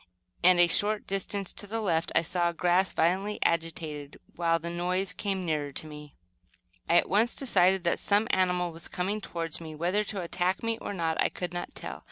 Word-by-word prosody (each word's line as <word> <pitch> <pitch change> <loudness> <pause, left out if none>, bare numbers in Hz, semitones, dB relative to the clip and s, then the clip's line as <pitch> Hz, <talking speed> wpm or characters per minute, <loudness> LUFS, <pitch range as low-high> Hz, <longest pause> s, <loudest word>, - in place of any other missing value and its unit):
and, 180 0 +6
a 175 - +8
short 205 +5 +2
distance 195 0 -2
to 205 - -6
the 225 +3 -2
left 170 -6 0
I - - +4
saw 175 +1 0
the 170 - -18
grass 180 +1 +2
violently 190 +5 +1
agitated, 160 -3 -2 0.2
while 165 -1 +2
the 170 +1 -5
noise 180 +2 +1
came 195 -3 -3
nearer 150 -3 -1
to - - -4
me. 150 -1 -11 0.7
I 170 - +4
at - - +3
once 220 +5 +2
decided 190 -7 +3
that 170 - +1
some 210 +2 +2
animal 180 -2 +1
was 165 +1 -4
coming 200 +4 -2
toward 165 -3 -4
me, 160 -1 -8
whether 180 +7 +1
to 200 -2 -3
attack 180 +3 -1
me 230 0 -1
or - - -5
not, 165 -2 0
I - - +3
could 180 -1 -5
not 175 0 -5
tell. - - -6
180 Hz, 205 wpm, -28 LUFS, 165-195 Hz, 0.7 s, a